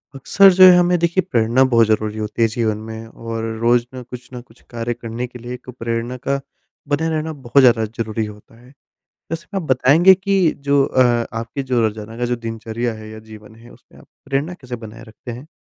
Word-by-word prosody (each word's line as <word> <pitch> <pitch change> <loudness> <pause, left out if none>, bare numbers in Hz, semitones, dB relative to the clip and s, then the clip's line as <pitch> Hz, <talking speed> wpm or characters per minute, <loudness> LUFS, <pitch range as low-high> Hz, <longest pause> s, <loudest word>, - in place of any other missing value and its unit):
अक्सर 195 +9 +5
जो 185 +1 +6
है, 185 -1 +10
हमें, 180 0 +3
देखिए, 170 +2 +1
प्रेरणा 120 +1 +3
बहुत 115 -2 +5
ज़रूरी 110 0 0
होती 105 +1 -4
है 115 - +5
जीवन 110 -1 -1
में 110 0 -8
और 115 0 -6 0.2
रोज़ 120 0 +3
ना 130 - -7
कुछ 125 +1 -11
ना 125 - -7
कुछ 115 -1 -23
कार्य 120 0 -3
करने 120 +1 -6
के 125 0 -12
लिए 120 +1 -7
एक 125 +1 -10
प्रेरणा 115 +2 -3
का 140 +2 -2 0.5
बने 150 +3 0
रहना 160 0 -2
बहुत 140 - +4
ज़्यादा 120 -3 +4
ज़रूरी 110 0 -4
होता 105 +2 -13
है। 120 - -18 0.6
वैसा 165 0 -5
ना, - - +1
आप - - -5
बताएँगे 145 +9 +6
कि 190 -2 +1 0.2
जो 140 -1 +4
अ, 130 - 0 0.4
आपकी 115 +4 -5
जो 130 -2 0
रोज़ाना 110 0 -3
का 120 - -1
जो 120 0 -1
दिनचर्या 115 +1 -4
है 110 0 -10
या 110 - -9
जीवन 110 0 -13
है, 115 +1 -16
उसमें - - -20
आप - - -19 0.2
प्रेरणा 140 +5 -2
कैसे 125 -7 -8
बनाए 115 +2 -12
रखते 115 +2 -11
हैं? 125 +5 -10
120 Hz, 215 wpm, -19 LUFS, 115-140 Hz, 0.6 s, है